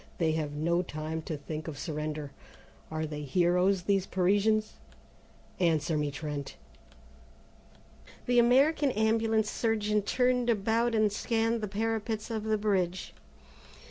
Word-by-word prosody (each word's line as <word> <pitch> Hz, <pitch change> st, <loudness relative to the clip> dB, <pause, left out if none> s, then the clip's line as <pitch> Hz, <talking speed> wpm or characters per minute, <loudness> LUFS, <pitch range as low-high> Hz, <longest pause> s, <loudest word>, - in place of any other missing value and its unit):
They 165 Hz, -3 st, +1 dB
have 155 Hz, -2 st, -2 dB
no 170 Hz, +4 st, +1 dB
time 160 Hz, -1 st, -5 dB
to 155 Hz, -, -2 dB
think 155 Hz, +2 st, -6 dB
of 155 Hz, -3 st, -6 dB
surrender. 150 Hz, -2 st, -4 dB, 0.6 s
Are 155 Hz, 0 st, -2 dB
they 150 Hz, -1 st, -5 dB
heroes, 180 Hz, +5 st, +2 dB
these 195 Hz, 0 st, +1 dB
Parisians? 205 Hz, +4 st, +2 dB, 0.9 s
Answer 165 Hz, -2 st, +1 dB
me, 150 Hz, -1 st, 0 dB
Trent!" 145 Hz, -1 st, -5 dB, 1.7 s
The 245 Hz, 0 st, +3 dB
American 275 Hz, +5 st, +4 dB
Ambulance 220 Hz, 0 st, +1 dB
surgeon 215 Hz, -2 st, 0 dB
turned 250 Hz, +3 st, +1 dB
about 230 Hz, +2 st, +1 dB
and 215 Hz, -1 st, +3 dB
scanned 225 Hz, +1 st, 0 dB
the 210 Hz, -, -2 dB
parapets 220 Hz, +2 st, -2 dB
of 220 Hz, -1 st, -3 dB
the 220 Hz, 0 st, +1 dB
bridge. 190 Hz, -4 st, -1 dB
200 Hz, 125 wpm, -29 LUFS, 160-225 Hz, 1.7 s, American